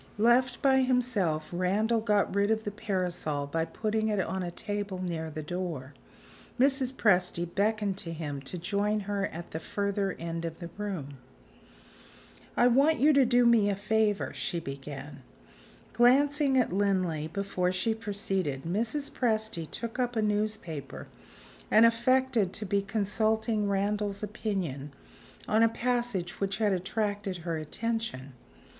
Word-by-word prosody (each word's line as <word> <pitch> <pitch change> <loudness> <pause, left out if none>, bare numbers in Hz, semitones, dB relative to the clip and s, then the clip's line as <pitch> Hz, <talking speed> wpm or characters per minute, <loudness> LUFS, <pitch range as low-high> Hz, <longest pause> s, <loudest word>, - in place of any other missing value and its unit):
Left 240 +3 +3
by 265 -1 +5
himself, 240 -12 0
Randal 210 +6 +1
got 210 -2 +1
rid 200 +1 +2
of 220 0 +1
the 205 - -3
parasol 180 -8 -2
by 160 +3 -1
putting 220 +3 -1
it 210 -2 0
on 190 +1 -1
a 175 - -3
table 205 0 -4
near 165 -3 -3
the 155 0 -6
door. 155 -5 -4 0.7
Mrs. 265 -1 +3
Presty 180 -8 +2
beckoned 200 +1 0
to 165 - -6
him 150 -4 -5
to 135 +7 -5
join 205 +4 0
her 200 0 -1
at 170 +1 -9
the 160 - -4
further 200 +1 -1
end 165 0 -4
of 165 -1 -4
the 170 -2 -8
room. 180 -10 -5 1.4
"I 240 - +5
want 275 +6 +4
you 300 +3 +5
to 275 -3 +5
do 245 0 +4
me 230 -3 +5
a 200 - +1
favor," 210 0 0
she 170 - -2
began. 140 -1 -8 0.7
Glancing 275 +4 +4
at 245 -8 +2
Linley 185 -6 +1
before 185 0 -1
she 185 +5 0
proceeded, 195 -10 -2
Mrs. 230 - -1
Presty 220 - -1
took 230 +7 -5
up 245 -1 0
a 220 - +2
newspaper, 210 -8 -3 0.6
and 220 +2 +7
affected 235 -3 +2
to 215 - -4
be 200 +1 +1
consulting 215 +1 0
Randal's 200 +1 -1
opinion 190 - -3 0.5
on 220 +1 +3
a 230 - +6
passage 235 -7 -1
which 195 0 -1
had 210 -3 +2
attracted 200 +1 -2
her 165 -2 -1
attention. 155 - -3
205 Hz, 145 wpm, -29 LUFS, 175-225 Hz, 1.4 s, and